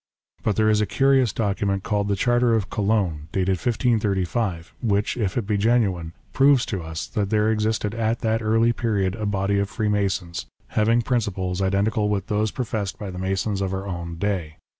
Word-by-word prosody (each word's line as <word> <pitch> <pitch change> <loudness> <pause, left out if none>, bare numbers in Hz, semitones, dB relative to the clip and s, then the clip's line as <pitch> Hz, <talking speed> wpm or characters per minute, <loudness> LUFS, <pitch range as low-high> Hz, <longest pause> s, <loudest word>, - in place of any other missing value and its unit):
But 105 - 0
there 110 0 +3
is 105 0 +3
a 105 - +1
curious 135 -4 +3
document 100 -2 -1
called 105 -2 0
the 100 - +1
Charter 120 +2 +2
of 105 -3 -2
Cologne 100 -8 0
dated 95 0 +1
1535, 105 -5 0
which, 105 -3 +1
if 105 -4 -1
it 115 - 0
be 105 0 0
genuine, 100 -7 +1 0.2
proves 135 -2 +5
to 95 -5 -3
us 80 -1 -5
that 100 -2 -2
there 110 0 +2
existed 110 -1 0
at 115 0 -1
that 110 0 +1
early 115 +2 +3
period 100 -6 0
a 110 -1 -3
body 100 0 0
of 100 0 -1
Freemasons, 100 -6 -1 0.2
having 115 +2 +2
principles 95 -6 -1
identical 105 +3 +1
with 100 -2 -1
those 105 0 +1
professed 110 -5 -3
by 100 -3 -6
the 90 - -7
Masons 95 +2 -1
of 95 -1 -1
our 95 +1 -4
own 85 -3 -5
day. 85 -4 -2
105 Hz, 185 wpm, -23 LUFS, 95-110 Hz, 0.2 s, proves